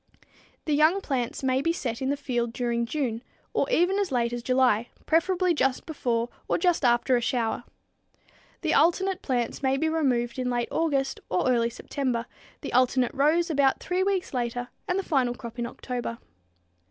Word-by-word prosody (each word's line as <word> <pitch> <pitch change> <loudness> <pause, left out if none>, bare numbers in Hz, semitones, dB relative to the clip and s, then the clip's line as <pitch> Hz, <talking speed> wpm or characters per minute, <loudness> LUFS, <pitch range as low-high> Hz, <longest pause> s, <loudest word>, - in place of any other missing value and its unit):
The 305 - 0
young 310 +6 +4
plants 265 -8 -3
may 260 0 +2
be 330 - +1
set 245 -8 -3
in 265 - 0
the 285 - 0
field 240 -4 -2
during 235 -1 -1
June, 245 -5 -2 0.3
or - - +1
even 385 -3 +3
as 395 -6 -1
late 240 -2 +1
as 240 - -3
July, 250 -3 +2 0.2
preferably 360 +2 +2
just 270 -4 0
before 240 -6 -1 0.2
or - - +1
just 355 -5 +2
after 245 +1 +3
a 240 - +1
shower. 240 -1 -1 1.0
The - - +1
alternate 375 +3 +3
plants 245 -4 -1
may 265 0 +2
be 315 +3 +1
removed 260 -6 0
in 250 -1 -1
late 240 -1 -1
August 280 -5 0
or 185 - +1
early 235 -2 +3
September, 245 -1 -3 0.4
the - - -6
alternate 255 0 +3
rows 320 +5 +2
about 280 -3 +3
three 360 +1 -1
weeks 385 -4 0
later 245 0 -2 0.2
and 360 - 0
the 390 - -1
final 255 -7 +1
crop 235 0 -9
in 240 - -1
October. 245 -2 -5
260 Hz, 180 wpm, -26 LUFS, 240-315 Hz, 1.0 s, young